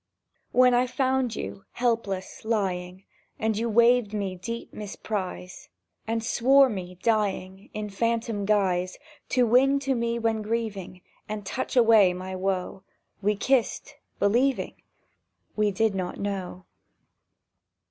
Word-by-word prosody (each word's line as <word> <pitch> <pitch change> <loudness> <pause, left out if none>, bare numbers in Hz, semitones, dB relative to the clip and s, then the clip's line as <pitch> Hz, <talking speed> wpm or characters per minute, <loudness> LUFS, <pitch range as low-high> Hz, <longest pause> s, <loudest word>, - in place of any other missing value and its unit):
When 250 0 +5
I 245 +1 +3
found 260 -1 0
you, 95 0 -6
helpless 225 -6 -2
lying, 190 -4 -2 0.3
And 220 0 0
you 230 +2 -1
waived 235 -1 +4
my 200 -3 -2
deep 230 +6 -6
misprise, 195 -3 -5 0.4
And 225 0 -1
swore 265 +4 +5
me, 180 -4 -6
dying, 200 -3 -1
In 210 0 -3
phantom 230 -1 -1
guise 185 -3 +1 0.3
To 250 -1 +3
wing 260 +4 +4
to 270 -1 0
me 235 -1 -1
when 225 -1 0
grieving, 210 -5 -4 0.3
And 210 -1 -5
touch 260 - -3
away 220 -6 +6
my 185 +1 -6
woe, 190 0 -2 0.4
We 210 +1 +2
kissed, 250 +3 0 0.2
believing... 245 +7 +1 0.7
—We 210 -1 +2
did 215 +1 +1
not 185 -2 -4
know! 190 -2 -4
215 Hz, 125 wpm, -26 LUFS, 190-235 Hz, 0.7 s, away